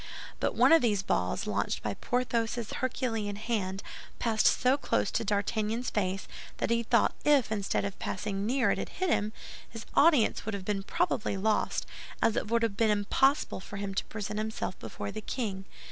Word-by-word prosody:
But - - 0
one - - +5
of 330 -1 +8
these 210 -5 +1
balls, 90 - 0
launched 100 0 -1
by 105 - -1
Porthos' 235 - -1
herculean 225 -5 -2
hand, 200 -3 -2 0.3
passed 225 -2 +2
so 255 +1 +4
close 280 - 0
to - - 0
D'Artagnan's 215 +3 -1
face 190 -2 -1 0.3
that - - -1
he 235 0 +3
thought 235 0 +3
that 295 -1 +6
if, 245 -5 -3
instead 200 -2 0
of 200 -1 -5
passing 195 +1 -3
near, 255 +5 +2
it - - 0
had - - -4
hit 370 -2 -1
him, 210 -5 +1 0.4
his 225 -1 -8
audience 295 -7 +4
would 220 -1 -3
have 195 -2 -6
been 200 -1 -1
probably 200 +1 0
lost, 215 +2 0 0.3
as 225 - +2
it - - -1
would 235 0 +2
have 225 -3 0
been 225 -1 +3
impossible 210 +8 +2
for 200 +1 -8
him 200 -1 -3
to - - 0
present 210 0 -4
himself 215 -3 -3
before 105 -2 -6
the 215 - -6
king. 200 -5 -3
215 Hz, 190 wpm, -30 LUFS, 200-235 Hz, 0.4 s, of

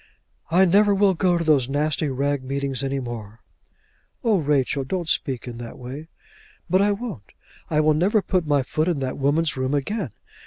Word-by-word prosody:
"I 180 +3 +5
never 200 +3 +4
will 195 -1 +4
go 180 0 +2
to 170 - -1
those 145 -6 +3
nasty 150 +1 0
rag 140 +1 -1
meetings 135 0 -3
any 135 0 -1
more." 115 -3 -7 0.8
"Oh 220 -5 +3
Rachel, 140 -2 +1
don't 175 +4 -3
speak 130 -6 0
in 120 -1 -7
that 120 -1 -8
way." 135 +5 -8 0.6
"But 185 +3 +3
I 205 +1 +3
won't. 200 - -6 0.4
I 155 -1 +2
will 155 0 +4
never 195 +7 +2
put 180 -4 0
my 145 -2 +2
foot 155 +5 -1
in 175 -4 +1
that 130 +1 -3
woman's 155 +4 +1
room 130 +2 -1
again. 155 - -2
150 Hz, 185 wpm, -23 LUFS, 135-180 Hz, 0.8 s, I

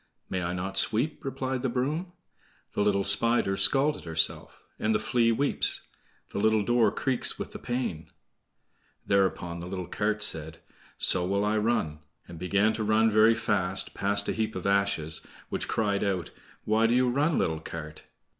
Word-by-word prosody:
"May 95 - -1
I 85 0 -2
not 95 +2 -3
sweep?" 125 +8 0
replied 130 -1 -3
the 130 - -1
broom: 150 +9 -2 0.6
"The - - -1
little 100 -1 +2
Spider's 100 -1 +1
scalt 135 +9 +3
herself, 80 -1 -1 0.2
And 110 0 +1
the - - +2
Flea 115 +1 +2
weeps; 140 +5 +2 0.5
The - - -3
little 110 0 +2
door 120 0 +3
creaks 130 +3 0
with - - -6
the - - -8
pain,"— 120 -10 -4 1.0
Thereupon 95 -3 0
the 85 - -7
little 90 -1 -5
cart 105 +3 -1
said: 80 -5 -3 0.4
"So 90 - +5
will 100 +3 0
I 105 +1 +1
run," 105 -9 -1 0.3
and 85 -2 -10
began 100 +5 +2
to 110 - -3
run 110 +1 +3
very 110 +2 +5
fast, 95 -4 0
past 100 +1 +1
a - - 0
heap 110 0 -2
of 95 - -5
ashes, 100 -6 +1 0.3
which - - -3
cried 100 -2 0
out: 95 -5 -2 0.3
"Why 110 +1 +3
do 120 - +2
you 125 0 +3
run, 145 +6 +1
little 80 -1 0
cart?" 80 -1 -8
105 Hz, 170 wpm, -27 LUFS, 95-115 Hz, 1.0 s, So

